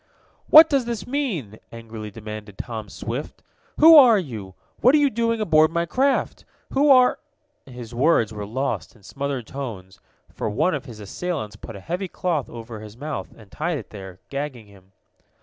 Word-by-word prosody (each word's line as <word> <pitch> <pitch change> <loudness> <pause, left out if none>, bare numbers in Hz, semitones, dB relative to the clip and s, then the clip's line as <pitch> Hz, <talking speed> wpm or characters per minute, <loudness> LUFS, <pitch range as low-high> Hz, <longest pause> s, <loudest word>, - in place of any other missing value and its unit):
"What 315 +1 +10
does 275 -5 +1
this 230 -5 -4
mean?" 195 - -3
angrily 115 -2 -8
demanded 105 -1 -9
Tom 110 -4 -6
Swift. 120 +8 -6 0.4
"Who 320 +1 +9
are 250 -7 +8
you? 110 - -6 0.2
What 255 +4 +5
are - - +6
you 285 -2 +3
doing 230 0 0
aboard 155 -6 +4
my 170 +1 -1
craft? 265 +9 0 0.3
Who 285 +2 +3
are 255 -2 +5 0.3
" 295 0 -47
His 125 -2 -10
words 120 -4 +2
were 105 -1 -6
lost 130 +5 -3
in 105 - -22
smothered 135 0 -4
tones, 105 -8 -8 0.3
for - - -3
one 120 - +1
of 145 -2 -4
his 115 -5 -11
assailants 110 - -5
put 110 +1 -10
a - - -8
heavy 180 - -4
cloth 170 -5 -2
over 115 -1 -9
his 105 +1 -11
mouth, 150 +3 -5
and 110 -3 -17
tied 165 +1 -2
it 115 - -10
there, 95 -3 -10
gagging 140 -5 -5
him. 100 -1 -20
135 Hz, 180 wpm, -23 LUFS, -, 0.4 s, What